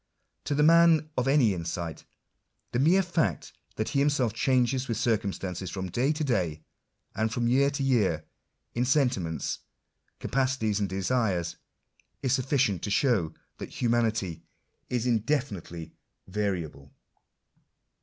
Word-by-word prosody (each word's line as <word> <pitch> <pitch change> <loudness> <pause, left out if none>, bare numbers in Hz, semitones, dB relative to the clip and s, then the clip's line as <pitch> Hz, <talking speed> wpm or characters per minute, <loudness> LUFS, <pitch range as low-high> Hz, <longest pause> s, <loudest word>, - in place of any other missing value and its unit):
To 145 - 0
the 150 - +3
man 165 -1 +5
of 125 +1 0
any 135 -7 +4
insight, 85 -1 -5 0.7
the 120 - 0
mere 175 +8 +4
faot 165 - -1 0.2
that 110 - -2
he 140 - 0
himself 140 -6 +2
changes 130 +2 +1
with 115 -3 -2
circumstances, 100 -5 -1
from 95 0 -5
day 125 - +1
to 155 0 -2
day, 90 - -1 0.5
and 110 0 0
from 120 +1 0
year 135 +3 +4
to 140 -1 -3
year, 105 - +1 0.5
in 120 - 0
sentiments, 125 - 0 0.6
capacities, 130 -6 0
and 100 -2 -1
desires, 95 -3 0 0.7
is 130 -2 +2
sufficient 130 - +1
to - - -3
show 100 - +1 0.2
that - - -6
humanity 115 -7 0 0.5
is 120 -1 -1
indefinitely 110 - -1 0.3
variable. 90 -8 -3
115 Hz, 125 wpm, -28 LUFS, 95-135 Hz, 0.7 s, man